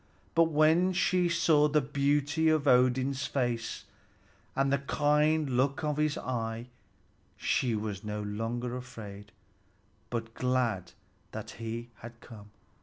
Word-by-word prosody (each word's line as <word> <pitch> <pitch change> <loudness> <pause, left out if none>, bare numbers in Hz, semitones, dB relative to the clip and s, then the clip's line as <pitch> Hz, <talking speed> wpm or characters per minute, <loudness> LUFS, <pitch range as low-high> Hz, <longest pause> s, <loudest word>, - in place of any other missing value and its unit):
But 165 - +5
when 160 +4 +3
she 180 -1 +2
saw 155 -3 +4
the 150 +1 +3
beauty 145 +3 +1
of 155 -2 +2
Odin's 130 +1 +3
face 120 -4 -2 0.7
and 135 0 +2
the 140 - +2
kind 150 +2 +2
look 135 +4 +1
of 150 -1 -1
his 150 -1 +1
eye, 115 -1 -4 0.7
she 120 -4 +1
was 105 -1 -4
no 105 0 -4
longer 115 +4 -3
afraid, 110 -5 -9 0.8
but 115 -1 -4
glad 120 -9 -1 0.4
that - - -6
he 115 +1 -6
had 120 +1 -11
come. 105 -3 -13
130 Hz, 125 wpm, -30 LUFS, 115-150 Hz, 0.8 s, But